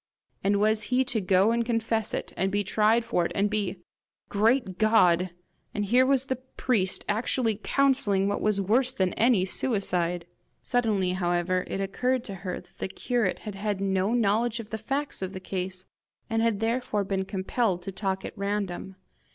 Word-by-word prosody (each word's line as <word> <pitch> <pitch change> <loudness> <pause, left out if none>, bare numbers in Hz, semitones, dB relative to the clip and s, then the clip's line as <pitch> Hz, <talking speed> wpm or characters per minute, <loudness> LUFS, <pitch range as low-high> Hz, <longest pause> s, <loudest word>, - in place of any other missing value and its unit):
And 200 +1 +2
was 215 0 +2
he 255 +1 +3
to 235 -4 -1
go 190 +3 +3
and 235 0 +1
confess 225 -2 0
it, - - -4
and 190 +2 0
be 205 +1 +1
tried 220 +3 +2
for 180 -6 +1
it, - - -2
and 205 +1 +1
be? 200 -3 -1 0.5
Great 215 -2 +1
God! 185 -5 +4 0.5
And 205 - 0
here 250 +5 +4
was 270 -1 +2
the 260 -2 -2
priest 250 -6 -1
actually 225 0 0
counselling 255 -9 +2
what 205 - -1
was 210 -1 +1
worse 230 +7 +2
than 185 -2 0
any 225 -5 +3
suicide! 180 -6 0 0.4
Suddenly, 215 -7 +1
however, 180 0 0
it 195 - -3
occurred 250 +6 0
to 200 - -6
her 185 -2 -4
that 175 0 -27
the - - -2
curate 235 0 -1
had 210 - -6
had 200 0 -2
no 195 +3 +1
knowledge 230 +1 +1
of 225 -2 -8
the 220 - -3
facts 275 +5 -2
of 190 0 -4
the 190 - -5
case, 185 0 -4 0.5
and 225 0 +2
had 225 -3 +1
therefore 225 -2 0
been 195 0 -1
compelled 190 0 -1
to 195 - -5
talk 190 0 -2
at - - -7
random. 200 -2 -3
205 Hz, 180 wpm, -27 LUFS, 190-230 Hz, 0.5 s, God